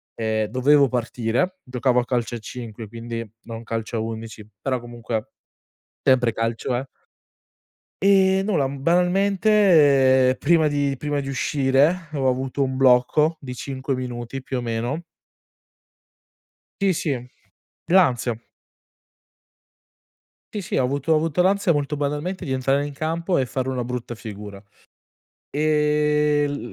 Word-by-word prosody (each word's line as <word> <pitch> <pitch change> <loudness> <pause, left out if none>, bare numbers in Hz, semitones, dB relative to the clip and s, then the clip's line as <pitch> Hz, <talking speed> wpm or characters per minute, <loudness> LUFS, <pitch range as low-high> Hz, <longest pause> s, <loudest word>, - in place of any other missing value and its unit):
ehm, 110 -1 0
dovevo 140 +5 +4
partire. 125 +8 -1
Giocavo 125 0 +1
a 120 - -1
calcio 120 -1 -1
a - - -3
5, 115 -1 -8
quindi 115 0 -6
non 115 0 -8
calcio 115 0 -4
a - - -1
11 110 -1 -6
però, 130 -2 -1
comunque 120 -2 -5 0.7
sempre 125 -3 +3
calcio 115 +2 -2
è. 130 +2 -2 1.2
E 190 -1 +4
nulla, 180 -10 +1
mhmm, 135 0 -7
banalmente 175 -8 +4
prima 160 0 +3
di 145 -1 0
prima 145 +1 -2
di 135 - -6
uscire, 140 +5 +1
ho 135 -3 0
avuto 130 +2 -1
un 130 -1 -2
blocco 135 +5 +3
di 125 -3 -7
5 135 +1 -4
minuti 125 +1 -5
più 130 - -3
o - - -2
meno. 120 +7 -3 1.8
Sì, 195 -2 +3
sì. 130 -6 -3 0.6
L'ansia. 130 -10 +3 2.2
Sì, 210 - -3
sì. 175 - -3
Ho - - +3
avuto 140 +4 0
ho - - +4
avuto 160 +2 +1
l'ansia, 190 -1 +3
molto 145 0 -1
banalmente, 150 +6 -3
di 135 - -4
entrare 135 +2 +1
in 145 - -6
campo 165 +4 -1
e 130 - 0
fare 130 +1 -2
una 130 -2 -2
brutta 120 0 -5
figura. 105 -3 -9 0.9
Ehm, 150 -2 +1
135 Hz, 130 wpm, -23 LUFS, 120-150 Hz, 2.2 s, dovevo